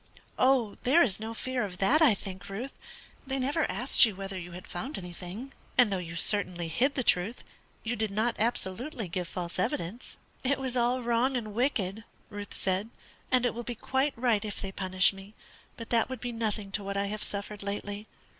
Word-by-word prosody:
"There 300 +7 +6
is 210 -8 +2
no 225 +1 -5
fear 255 +1 -1
of 185 -3 -5
that, 265 - +4
I 270 -10 +7
think, 190 0 -8
Ruth. 235 +8 -5 0.5
They 265 0 -1
never 285 +4 +1
asked 245 +8 +5
you 220 -4 +5
whether 195 0 -5
you 175 0 -8
had 180 +1 -8
found 265 - -5
anything; 180 +8 -7 0.2
and 240 -6 +6
though 190 - 0
you 170 -1 -6
certainly 180 -2 +1
hid 265 - +2
the 260 - +1
truth, 200 +4 +2 0.4
you 230 +2 -1
did 220 -1 0
not 220 +4 0
absolutely 230 +2 0
give 175 +1 -3
false 175 0 -3
evidence." 185 +6 -2 0.3
"It 270 +1 +2
was 260 -2 -2
all 245 +1 +2
wrong 240 +3 +2
and 215 -3 -4
wicked," 220 -4 0 0.3
Ruth 205 0 -6
said, 190 +3 0 0.4
"and 255 -1 +4
it 245 - +1
will 240 - -4
be 240 0 -5
quite 265 +4 0
right 230 -4 +2
if 210 -2 -4
they 195 - -4
punish 185 0 +3
me; 195 +2 -12 0.4
but 230 -1 -8
that 230 0 +3
would 260 - -4
be 245 - -3
nothing 215 -3 -2
to 205 +1 -2
what 200 0 -3
I 200 - +1
have 210 +1 -4
suffered 205 0 -3
lately. 205 +1 -4
215 Hz, 200 wpm, -30 LUFS, 195-245 Hz, 0.5 s, I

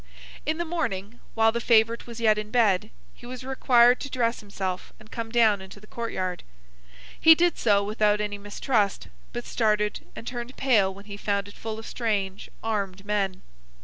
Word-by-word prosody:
In 310 +1 +1
the 345 - -2
morning, 235 - -3 0.2
while 225 0 +4
the 235 +1 -2
favourite 230 0 +3
was 235 -1 -8
yet 215 -2 +3
in 210 0 -6
bed, 215 -6 +2 0.2
he - - -13
was 255 0 -7
required 250 -2 +4
to 275 - -6
dress 240 -2 0
himself 190 -3 -5
and 215 0 -17
come 230 -2 -4
down 220 -4 +4
into 190 +2 -11
the 210 - -16
court 230 +1 -5
yard. 185 -1 -3 0.8
He 325 0 +8
did 345 0 +2
so 205 -3 +3
without 210 0 +2
any 205 -1 -3
mistrust, 205 0 -1 0.2
but 240 0 -5
started 210 -2 +1 0.2
and - - -8
turned 240 +1 -6
pale 220 -8 +3
when 200 +1 -12
he 200 -1 -8
found 200 -1 -1
it 205 - -11
full 220 -1 -6
of 225 - -8
strange 205 -5 -2
armed 200 -3 -2
men. 200 -3 -1
215 Hz, 185 wpm, -26 LUFS, 200-235 Hz, 0.8 s, He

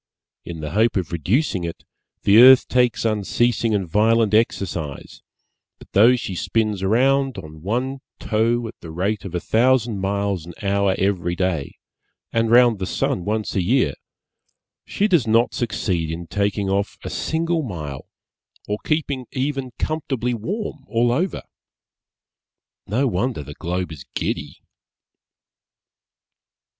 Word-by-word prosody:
In 80 -2 -7
the 75 -1 -5
hope 110 +3 +2
of 90 -4 -2
reducing 95 - 0
it, 85 -1 -6 0.4
the 100 +2 +6
earth 130 +2 +8
takes 125 -2 +1
unceasing 115 +1 +1
and 95 -3 -1
violent 110 +3 +3
exercise, 90 -9 -1 0.6
but - - -17
though 115 +6 +6
she 110 -5 -4
spins 105 +1 -1
round 135 +5 +2
on 80 -4 -9
one 125 - -2 0.2
toe 115 +2 0
at - - -8
the 85 - -9
rate 95 +7 -2
of 90 -2 -6
a - - +1
thousand 115 0 +2
miles 100 -2 -1
an 85 +1 -11
hour 100 -1 +2
every 90 -3 0
day, 85 -6 -2 0.6
and 115 0 +1
round 120 -2 +5
the 95 - -3
sun 90 - -1
once 110 +1 -2
a 95 - +1
year, 90 - +2 0.9
she 205 - +1
does 170 - +2
not 115 +2 +3
succeed 95 -8 -1
in 85 +2 -5
taking 100 +2 -1
off 100 +1 -1
a - - -4
single 165 +1 -1
mile 75 - -6 0.6
or 105 +1 -2
keeping 140 -5 -1
even 135 -1 -2
comfortably 135 -6 -2
warm 160 - -4
all 120 +1 +2
over. 170 +10 -1 1.4
No 120 +8 +1
wonder 110 - -1
the 75 +2 -9
globe 90 +2 -3
is 75 -5 -9
giddy! - - -4
110 Hz, 140 wpm, -22 LUFS, 95-125 Hz, 1.4 s, earth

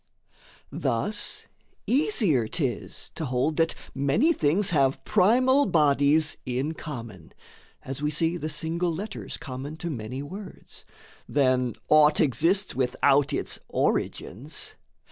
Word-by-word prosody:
Thus 205 - -1 0.4
easier 220 - +2
'tis 135 -4 -4
to 160 - -4
hold 130 +4 -1
that 165 0 +1 0.2
many 140 - +2
things 180 - +2
Have 135 -3 +1
primal 255 +8 +4
bodies 150 -2 +3
in 130 +5 -2
common 115 - -9 0.5
(as 135 +1 -6
we 150 - 0
see 165 +3 +1
The 155 -2 -4
single 165 +3 -1
letters 200 +6 -6
common 135 +4 -7
to 170 +1 -4
many 125 +1 -5
words) 190 +7 -10 0.4
Than 130 -4 +1
aught 150 0 +5
exists 165 - +2
without 135 +2 +2
its - - -2
origins. 135 - -2
150 Hz, 115 wpm, -26 LUFS, 130-175 Hz, 0.5 s, aught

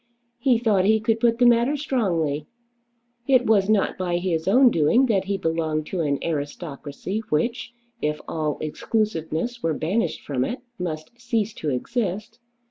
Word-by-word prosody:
He 245 -1 +3
thought 215 -5 +2
he 220 +2 +4
could 225 +1 0
put 230 -1 +3
the 245 - +4
matter 240 +4 +4
strongly. 170 - -1 0.8
It 255 -2 +4
was 205 -2 +3
not 210 -3 +2
by 175 -2 0
his 175 -2 -1
own 250 +5 +6
doing 170 - +4
that 200 -6 +1
he 200 0 -1
belonged 160 -3 -1
to 185 - -2
an 145 -3 +1
aristocracy 150 +3 -4
which, 230 +11 -1 0.3
if 150 0 -1
all 155 -2 -2
exclusiveness 210 +5 -2
were 160 -2 0
banished 190 +11 -1
from 130 -3 -1
it, 250 - -3 0.2
must 155 -3 -4
cease 230 -3 -1
to 155 - -4
exist. 210 - -3
195 Hz, 155 wpm, -24 LUFS, 155-230 Hz, 0.8 s, own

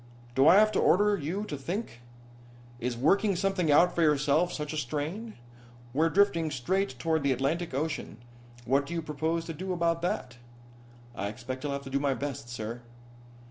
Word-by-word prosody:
Do 135 +3 +4
I 175 - +8
have 215 +1 +6
to - - 0
order 205 +2 +4
you 180 +4 -3
to 155 - -5
think? 155 - -5 0.8
Is 120 0 -2
working 195 - +3
something 185 -3 +1
out 175 +5 +5
for 170 - 0
yourself 150 +2 +3
such 150 0 -4
a - - -3
strain? 155 - -4 0.6
We're 160 +4 +3
drifting 170 -4 +3
straight 145 +3 -1
toward 160 +4 0
the 140 -1 +1
Atlantic 140 +5 -1
Ocean. 150 -6 -3 0.5
What 140 +3 +2
do 170 - -5
you 165 - -2
propose 160 +2 -2
to 165 - -5
do 185 +5 -5
about 170 -1 0
that?" 130 -8 -3 0.8
"I 100 -3 -3
expect 130 +5 -6
I'll 145 - -1
have 140 0 -4
to 135 - -9
do 140 - +1
my 140 -1 +1
best, 140 -4 -5
sir." 115 0 -5
155 Hz, 180 wpm, -29 LUFS, 135-175 Hz, 0.8 s, I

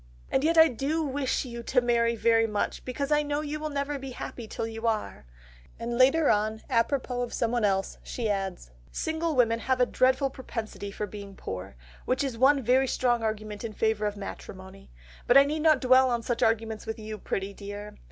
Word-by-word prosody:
"And 265 - +2
yet 330 +2 +2
I 320 0 +9
do 290 +5 -1
wish 275 -2 -1
you 235 -1 -6
to 250 +2 +2
marry 235 -1 +2
very 225 0 +3
much 210 -2 -2
because 280 +3 -3
I 295 0 +4
know 290 0 -2
you 305 0 -4
will 310 0 -3
never 285 0 -2
be 270 0 -7
happy 240 -1 -7
till 225 - -4
you 225 +1 -4
are," 215 - -2 0.5
and 235 +1 -3
later 270 +5 +5
on, 215 +1 0
apropos 250 +1 0
of 245 - -3
someone 235 0 0
else, 195 -2 0
she 235 -3 -4
adds: 195 - -3 0.2
"Single 320 0 -2
women 230 -2 +3
have 260 +2 0
a 250 - +5
dreadful 260 +2 +2
propensity 225 -6 -6
for 205 +1 -4
being 200 -1 -9
poor, 95 - -7 0.3
which 260 +3 +1
is 270 -4 -2
one 270 +3 +4
very 260 +3 +3
strong 240 -2 +1
argument 215 -1 -4
in 225 -2 -5
favour 220 -1 0
of 205 0 -4
matrimony, 190 - -9 0.4
but 245 - +7
I 275 - +9
need 305 +2 -2
not 310 -3 +5
dwell 260 0 +5
on 235 -1 -1
such 240 0 -2
arguments 225 -1 0
with 220 +1 -3
you, 215 -1 -7
pretty 195 +1 -3
dear. 205 +1 -8
235 Hz, 200 wpm, -27 LUFS, 215-270 Hz, 0.5 s, I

